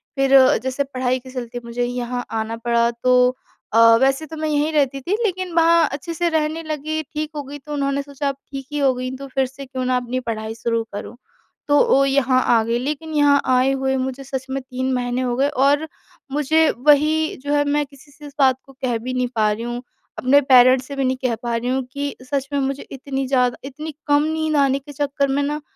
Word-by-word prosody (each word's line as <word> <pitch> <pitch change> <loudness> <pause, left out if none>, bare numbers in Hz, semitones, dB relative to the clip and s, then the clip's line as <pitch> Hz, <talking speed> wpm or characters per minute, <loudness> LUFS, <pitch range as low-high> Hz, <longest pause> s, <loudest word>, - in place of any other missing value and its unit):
फ़िर 270 0 +3 0.3
जैसे 260 +2 -1
पढ़ाई 255 -2 -1
के 260 +1 -13
चलते 245 -1 -5
मुझे 235 +1 -3
यहाँ 245 0 -3
आना 225 0 -2
पड़ा 235 0 +1
तो 250 +1 +3 0.4
अ, 225 - +5 0.2
वैसे 270 +3 +2
तो 320 - -9
मैं 310 0 -2
यहीं 300 +1 +1
रहती 275 -2 +1
थी 350 +9 -2
लेकिन 370 -3 -2
वहाँ 335 -1 +5
अच्छे 290 +4 -5
से 345 +1 0
रहने 315 0 -1
लगी 310 0 -3
ठीक 305 0 -3
हो 295 - -3
गई 280 +2 -8
तो 295 +2 -8
उन्होंने 280 -1 0
सोचा 280 0 -3
अब 275 - -4 0.2
ठीक 270 -1 -6
ही 295 - -3
हो 270 -2 +3
गई 255 0 -4
तो 275 +1 -8
फ़िर 265 0 0
से 270 +2 -9
क्यों 260 -1 -4
ना 255 0 +2
अपनी 250 +1 -3
पढ़ाई 220 -2 -4
शुरू 230 0 -1
करूँ। 205 - -7 0.5
तो 290 0 +4
ओ, 275 - +4
यहाँ 270 -2 +2 0.2
आ 225 - +2
गई 230 +1 0
लेकिन 300 +4 -4
यहाँ 285 -1 +4
आए 255 +1 +3
हुए 265 0 0
मुझे 265 +1 -3
सच 265 -1 -5
में 270 +1 -2
3 260 0 -3
महीने 245 0 -1
हो 245 -1 -1
गए 270 +3 +2
और 285 +2 +2 0.4
मुझे 305 +3 +3 0.2
वही 305 +2 +4
जो 290 0 -1
है 290 0 +3
मैं 290 +1 +1
किसी 280 +1 -19
से 295 +1 -14
इस 285 - -13
बात 260 -2 +4
को 270 - -16
कह 245 -3 0
भी 250 +3 -5
नहीं 250 0 0
पा 215 -1 +2
रही 215 +2 -4
हूँ। 240 +1 -4 0.4
अपने 275 +3 +4
पेरेंट्स 255 -1 +5
से 280 - -6
भी 275 - -1
नहीं 260 0 0
कह 240 -2 +1
पा 235 -1 -1
रही 235 +2 -2
हूँ 260 +1 0
कि 285 0 -3 0.2
सच 275 -1 -1
में 285 - +1
मुझे 275 0 -2
इतनी 270 0 -4
ज़्यादा 250 -2 +2
इतनी 300 +4 -7
कम 290 0 +4
नींद 315 0 -1
आने 275 -1 +3
के 280 +2 -12
चक्कर 280 0 0
में 275 +1 0
ना 295 +2 -2
270 Hz, 230 wpm, -21 LUFS, 255-290 Hz, 0.5 s, अ